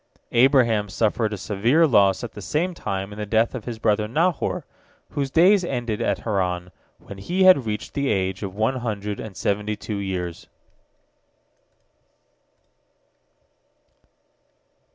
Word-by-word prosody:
Abraham 120 -5 +3
suffered 110 +2 0
a 105 - -4
severe 115 - +2
loss 100 -8 +3
at 120 - -5
the 105 - -10
same 170 - -1
time 95 - -4
in 105 - -10
the 105 - -3
death 110 +3 +2
of 125 -5 -6
his 120 -2 -5
brother 105 -1 +1
Nahor, 165 +7 0 0.4
whose 140 -2 -2
days 180 +6 +5
ended 120 -9 -3
at - - 0
Haran, 90 -4 -2 0.3
when 100 - -11
he 180 - 0
had 180 -11 +6
reached 105 -1 -4
the 140 -2 -1
age 95 -2 -1
of 95 -2 -5
one 110 +5 0
hundred 105 -4 -4
and 105 -4 -8
seventy 105 +1 -1
two 105 0 -5
years. 90 -3 -4
110 Hz, 135 wpm, -23 LUFS, 100-130 Hz, 0.4 s, had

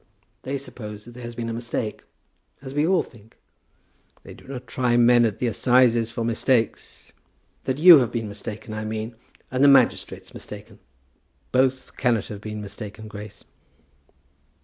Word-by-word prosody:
"They 140 +2 -3
suppose 105 -6 -8
that 120 - -11
there 125 +1 -11
has 120 0 -7
been 115 0 -4
a 115 - -3
mistake; 115 -1 -4 0.6
as 135 -1 -7
we 145 +2 +1
all 185 0 +3
think." 110 -2 -18 0.9
"They - - -11
do - - -17
not 130 -2 -7
try 120 0 +1
men 120 0 +6
at 110 -3 -1
the - - -2
assizes 120 -1 +3
for 115 0 -3
mistakes." 115 0 -1 0.5
"That 130 0 -1
you 165 0 +10
have 120 -3 0
been 115 -2 -3
mistaken, 105 +1 -7
I 110 0 -4
mean; 110 +2 -4 0.4
and 130 +1 +1
the - - +8
magistrates 135 -3 +3
mistaken." - - -10 0.7
"Both 130 0 +1
cannot 120 -5 +1
have 105 -1 -7
been 105 0 -6
mistaken, 105 +1 -8
Grace." 105 0 -10
120 Hz, 160 wpm, -24 LUFS, 110-130 Hz, 0.9 s, you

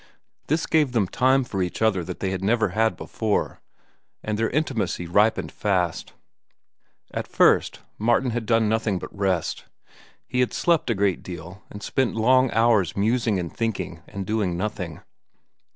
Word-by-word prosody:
This 155 +2 +1
gave 150 -5 +2
them 110 -6 +2
time 130 +6 +3
for 100 -6 -3
each 90 -1 -2
other 110 -5 +2
that 90 0 -7
they 95 - -1
had 95 0 -3
never 110 0 +2
had 110 +4 +1
before, 110 -2 -2 0.6
and 110 - -2
their 115 +1 0
intimacy 110 - -1
ripened 105 +6 +2
fast. 90 -5 -1 1.0
At - - -3
first, - - +3 0.2
Martin 120 +3 +2
had 115 -1 -3
done 115 -2 +3
nothing 110 -2 0
but - - -8
rest. 95 -4 -1 0.6
He 125 - -2
had 125 - +1
slept 170 -6 +1
a 115 - +2
great 100 -2 +1
deal, 90 +2 -9
and 105 0 -9
spent 130 -3 0
long 130 +3 +4
hours 110 -6 +2
musing 110 0 +1
and 85 -3 -5
thinking 105 -7 -3
and 100 -1 -6
doing 100 -4 -1
nothing. 90 -5 -4
105 Hz, 160 wpm, -24 LUFS, 95-120 Hz, 1.0 s, long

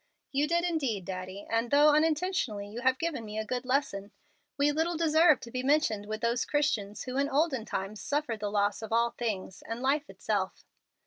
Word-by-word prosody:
"You 285 +2 +1
did 340 +2 +1
indeed, 275 - -1
Daddy, 185 +2 -6
and, 230 +1 0
though 290 +2 +6
unintentionally, 305 - +1
you 220 +4 -7
have 260 0 +3
given 330 -7 -2
me 215 0 -7
a 220 - -2
good 250 +3 -3
lesson. 230 -7 0 0.5
We 290 +1 +3
little 325 +3 0
deserve 315 -2 +5
to 235 - -9
be 255 - -2
mentioned 260 -7 +1
with 215 +1 -4
those 235 +1 +1
Christians 215 -9 -1
who 255 0 -4
in 280 +1 +1
olden 280 -5 +1
times 195 +1 -4
suffered 285 -6 -1
the 205 0 -2
loss 205 0 +1
of 220 - -7
all 235 +1 +3
things, 205 -6 -4
and 230 +1 -5
life 280 +4 0
itself." - - -3
250 Hz, 195 wpm, -30 LUFS, 215-295 Hz, 0.5 s, though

